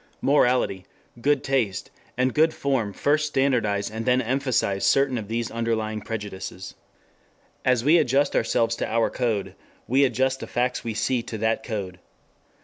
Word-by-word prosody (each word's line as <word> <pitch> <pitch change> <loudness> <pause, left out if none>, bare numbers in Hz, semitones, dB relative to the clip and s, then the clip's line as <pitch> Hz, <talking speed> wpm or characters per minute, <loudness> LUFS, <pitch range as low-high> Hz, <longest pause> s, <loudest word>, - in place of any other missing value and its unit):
Morality, 125 -8 +2 0.4
good 145 +1 +2
taste 125 -9 -1 0.3
and 125 0 +1
good 160 +1 +3
form 130 -7 -1
first 150 +7 +1
standardize 120 -8 0
and 110 +1 -4
then 125 +2 +3
emphasize 125 -5 0
certain 135 -1 +3
of 110 -4 -4
these 115 +1 -3
underlying 110 -2 -2
prejudices. 95 -4 -6 0.9
As 125 -2 +2
we 160 +5 +5
adjust 140 0 +2
ourselves 115 0 +1
to - - -2
our 115 0 +1
code, 115 -6 -1 0.3
we 135 +3 +3
adjust 130 +1 +1
the - - -7
facts 125 +1 -1
we 115 -2 -4
see 125 +2 0
to 115 - -6
that 110 +1 0
code. 95 -5 -5
120 Hz, 150 wpm, -24 LUFS, 110-135 Hz, 0.9 s, we